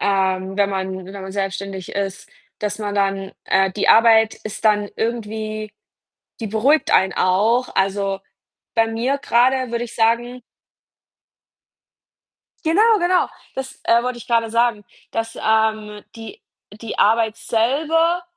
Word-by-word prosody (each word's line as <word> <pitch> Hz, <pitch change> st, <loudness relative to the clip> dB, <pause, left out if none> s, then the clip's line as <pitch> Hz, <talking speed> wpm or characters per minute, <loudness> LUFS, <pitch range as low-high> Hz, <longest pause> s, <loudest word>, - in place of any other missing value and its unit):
ähm, 190 Hz, -1 st, 0 dB
wenn 200 Hz, -1 st, +2 dB
man 190 Hz, -1 st, -4 dB
wenn 190 Hz, -, -10 dB
man 190 Hz, -, -7 dB
selbstständig 195 Hz, -1 st, -4 dB
ist, 200 Hz, 0 st, -4 dB, 0.3 s
dass 210 Hz, 0 st, -3 dB
man 205 Hz, -1 st, -3 dB
dann 195 Hz, -1 st, 0 dB
äh, 190 Hz, 0 st, +2 dB
die 200 Hz, -, -2 dB
Arbeit 225 Hz, -1 st, +6 dB
ist 215 Hz, +1 st, -7 dB
dann 210 Hz, -1 st, +3 dB
irgendwie 215 Hz, -2 st, -3 dB, 0.7 s
die 225 Hz, -, -3 dB
beruhigt 250 Hz, +9 st, +2 dB
einen 190 Hz, 0 st, +3 dB
auch. 220 Hz, +7 st, +2 dB
Also, 195 Hz, 0 st, 0 dB, 0.6 s
bei 225 Hz, -1 st, +3 dB
mir 240 Hz, +5 st, -1 dB
grade 255 Hz, -1 st, +2 dB
würde 235 Hz, 0 st, -2 dB
ich 235 Hz, -, -12 dB
sagen 240 Hz, +2 st, +1 dB, 2.2 s
Genau, 425 Hz, +7 st, +4 dB
genau. 355 Hz, +1 st, +2 dB, 0.3 s
Das, 265 Hz, 0 st, -7 dB
äh, 235 Hz, +1 st, +4 dB
wollte 250 Hz, -1 st, -3 dB
ich 240 Hz, -, -12 dB
grade 230 Hz, -2 st, +1 dB
sagen, 230 Hz, -2 st, +1 dB, 0.3 s
dass, 225 Hz, 0 st, -4 dB
ähm, 220 Hz, -1 st, 0 dB
die 225 Hz, -2 st, -10 dB, 0.3 s
die 215 Hz, +1 st, -8 dB
Arbeit 220 Hz, 0 st, +3 dB
selber 305 Hz, +10 st, +1 dB
220 Hz, 135 wpm, -20 LUFS, 200-235 Hz, 2.2 s, Arbeit